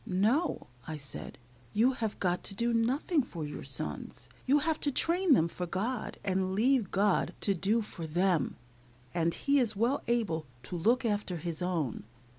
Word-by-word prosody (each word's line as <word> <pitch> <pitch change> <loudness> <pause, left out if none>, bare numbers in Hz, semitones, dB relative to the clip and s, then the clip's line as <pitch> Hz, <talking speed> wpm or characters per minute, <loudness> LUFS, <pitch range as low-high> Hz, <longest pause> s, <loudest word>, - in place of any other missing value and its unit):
"No," 220 - +1 0.2
I 160 -1 -4
said, 140 -2 -6 0.4
"you 230 +5 +4
have 225 -5 -3
got 180 -1 0
to 195 - -3
do 235 +3 +1
nothing 265 +8 +2
for 170 - -6
your 145 - -6
sons. 120 - -4 0.2
You 280 +3 +5
have 310 +2 +1
to 285 - +1
train 340 +2 +4
them 160 - +3
for 180 +1 -5
God, 215 +7 -2
and 190 -1 0
leave 235 -1 +3
GOD 200 0 +2
to 200 - +2
do 205 +5 +1
for 170 -5 -7
them, 175 -1 +1 0.6
and 170 -1 +1
He 280 0 +2
is 225 -4 +1
well 235 +7 +1
able 200 - 0 0.2
to 175 - -6
look 235 +9 +2
after 205 -5 -1
His 165 0 -3
own. 165 - -1
205 Hz, 175 wpm, -31 LUFS, 175-245 Hz, 0.6 s, You